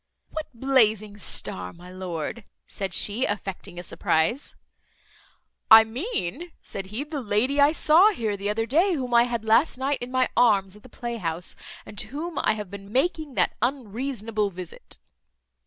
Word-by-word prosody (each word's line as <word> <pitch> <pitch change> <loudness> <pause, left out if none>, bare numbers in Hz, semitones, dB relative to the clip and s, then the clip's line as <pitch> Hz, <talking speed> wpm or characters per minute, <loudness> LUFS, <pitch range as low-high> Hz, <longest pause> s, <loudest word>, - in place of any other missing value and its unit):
"What 315 0 -4
blazing 220 -5 +2
star, 90 - -2
my 180 +1 -13
lord?" 185 +3 -5 0.2
said 195 -2 -5
she, 210 +7 0
affecting 195 -2 -5
a 175 - -6
surprize. 165 - 0 1.1
"I 220 0 +11
mean," 280 - -4
said 195 -1 -6
he, 215 +8 -4
"the 300 -1 -5
lady 240 +6 +1
I 285 +1 +6
saw 325 +5 +5
here 225 - -2
the 200 +1 -3
other 225 +2 0
day, 335 - +3
whom 250 -4 -3
I 235 0 +6
had 235 -2 -3
last 225 +7 +3
night 270 +2 -1
in 245 - -5
my 255 0 +2
arms 200 -5 +3
at 210 - -15
the 255 - -15
playhouse, 180 -9 -4 0.3
and 205 - -9
to - - -4
whom 310 +3 -4
I - - +2
have 210 -3 -6
been 200 0 -9
making 300 +1 0
that - - +2
unreasonable 230 -3 -2
visit." 180 -2 -10
225 Hz, 165 wpm, -25 LUFS, 200-270 Hz, 1.1 s, I